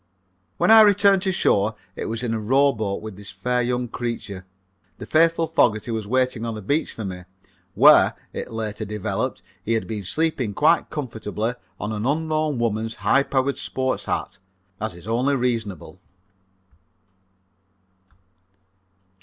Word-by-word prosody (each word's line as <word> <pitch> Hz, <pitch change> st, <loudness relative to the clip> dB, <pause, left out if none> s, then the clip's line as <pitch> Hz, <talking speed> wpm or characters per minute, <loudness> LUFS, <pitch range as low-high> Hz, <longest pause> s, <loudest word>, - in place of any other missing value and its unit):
When -, -, +3 dB
I 225 Hz, 0 st, +10 dB
returned 200 Hz, -2 st, +5 dB
to 190 Hz, 0 st, 0 dB
shore 105 Hz, -, +2 dB, 0.2 s
it -, -, -5 dB
was 115 Hz, +2 st, -3 dB
in 115 Hz, -2 st, -1 dB
a 110 Hz, -, -1 dB
rowboat 110 Hz, -4 st, +1 dB
with 110 Hz, -3 st, -8 dB
this 100 Hz, 0 st, -8 dB
fair 125 Hz, +7 st, -1 dB
young 125 Hz, 0 st, -1 dB
creature. 110 Hz, -6 st, -5 dB, 0.5 s
The -, -, -8 dB
faithful 165 Hz, +1 st, +3 dB
Fogerty 120 Hz, -9 st, +1 dB
was 110 Hz, -2 st, -3 dB
waiting 125 Hz, -1 st, 0 dB
on 115 Hz, -1 st, -3 dB
the 110 Hz, -, -7 dB
beach 145 Hz, +10 st, 0 dB
for 110 Hz, -, -6 dB
me, 90 Hz, -1 st, -6 dB, 0.5 s
where, -, -, +6 dB, 0.2 s
it -, -, -6 dB
later 110 Hz, -1 st, -4 dB
developed, 105 Hz, -1 st, -3 dB, 0.2 s
he 115 Hz, -, 0 dB
had 115 Hz, -, 0 dB
been 110 Hz, -2 st, -4 dB
sleeping 130 Hz, -, -1 dB
quite 155 Hz, +3 st, +3 dB
comfortably 115 Hz, -5 st, -3 dB, 0.3 s
on 105 Hz, -, -3 dB
an 110 Hz, +2 st, -2 dB
unknown 155 Hz, -1 st, 0 dB
woman's 115 Hz, -1 st, -1 dB
high 135 Hz, +7 st, +5 dB
powered 135 Hz, 0 st, -1 dB
sport 130 Hz, 0 st, -2 dB
hat, -, -, -3 dB, 0.4 s
as 110 Hz, -4 st, -4 dB
is 85 Hz, +4 st, -13 dB
only 125 Hz, +5 st, +1 dB
reasonable. 115 Hz, -, -3 dB
115 Hz, 145 wpm, -23 LUFS, 105-140 Hz, 0.5 s, I